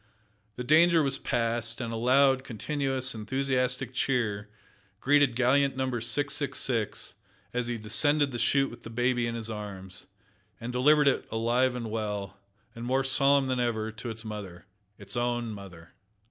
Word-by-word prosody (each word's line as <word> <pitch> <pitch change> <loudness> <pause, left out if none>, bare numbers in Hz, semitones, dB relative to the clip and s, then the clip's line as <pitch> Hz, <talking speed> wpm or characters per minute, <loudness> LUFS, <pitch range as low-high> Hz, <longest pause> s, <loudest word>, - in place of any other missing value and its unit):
The 125 - -5
danger 160 +4 +5
was 135 -1 -1
past, 115 -1 0
and 115 -2 -4
a - - -3
loud, 130 +3 +3
continuous, 135 +2 -1
enthusiastic 130 +2 -1
cheer 110 -5 -1 0.5
greeted 145 -2 +3
gallant 130 +2 +2
Number 130 -3 -1
666 135 -3 -1 0.4
as 125 -1 -1
he 120 -1 -2
descended 145 +7 +2
the 120 - -5
chute 135 +4 +2
with 120 - -12
the - - -9
baby 120 +1 0
in 115 - -3
his 115 -1 -4
arms, 100 -4 -8 0.5
and 120 +2 -6
delivered 145 +4 +4
it 140 - +1
alive 120 +3 +1
and 115 -3 -5
well, 105 -3 -4 0.4
and 115 - -9
more 130 +2 +1
solemn 135 +1 +3
than 130 -1 -1
ever, 110 -2 -1
to 110 +2 -7
its 115 0 -7
mother 100 -5 -8 0.3
its 100 -1 -7
own 120 -1 -1
mother! 95 -5 -11
120 Hz, 155 wpm, -28 LUFS, 110-135 Hz, 0.5 s, danger